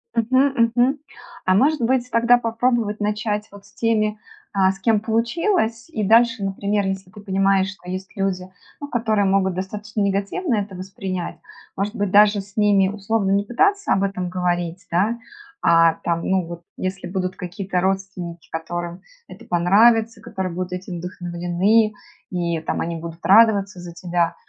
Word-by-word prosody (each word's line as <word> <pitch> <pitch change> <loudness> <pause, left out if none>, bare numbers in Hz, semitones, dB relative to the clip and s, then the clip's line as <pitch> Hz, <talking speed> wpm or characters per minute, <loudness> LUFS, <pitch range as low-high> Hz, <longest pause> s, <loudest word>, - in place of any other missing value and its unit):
Мгм, 240 0 +3
мгм. 255 +4 +3 0.5
А, 185 - +4
может 290 +8 +3
быть, 250 +1 +1
тогда 235 +1 +5
попробовать 230 -2 0
начать 210 0 -1
вот 200 0 -14
с - - -21
теми, 215 -2 0 0.3
а, 190 -1 +3
с 195 - -10
кем 220 +1 +2
получилось? 230 - 0
И 220 -10 -3
дальше, 230 +1 +4
например, 200 +1 -1
если 190 -1 -4
ты 190 - -13
понимаешь, 195 -1 +2
что 185 -2 -12
есть 185 +1 -6
люди, 190 -2 -2 0.3
ну, 285 - -6
которые 220 -6 +1
могут 190 -1 +2
достаточно 210 +3 -4
негативно 200 - 0
это 200 -2 -3
воспринять- 185 -1 -5 0.4
может 205 +3 -2
быть, 205 -3 -1
даже 205 0 +5
с 200 +1 -17
ними 200 -2 +4
условно 205 0 -1
не 200 +1 +2
пытаться 400 - +2
об 195 0 +1
этом 185 -2 -2
говорить, 175 0 -2
да. 200 +7 +1 0.5
А 165 0 +6
там, 170 0 -1
ну 190 -2 +1
вот, 170 0 -8 0.2
если 190 +1 -4
будут 185 0 -3
какие-то 185 +1 -3
родственники, 190 -3 -3
которым 175 +2 -5 0.3
это - - -13
понравится, 220 +6 +3
которые 190 -5 -4
будут 180 +1 -4
этим 180 -1 -5
вдохновлены. 180 +5 +1 0.4
И 170 -2 -1
там 160 - -3
они 170 0 -3
будут 165 +1 -8
радоваться 200 -2 +5
за 175 -1 -9
тебя. 170 -1 -1
195 Hz, 160 wpm, -22 LUFS, 185-220 Hz, 0.5 s, А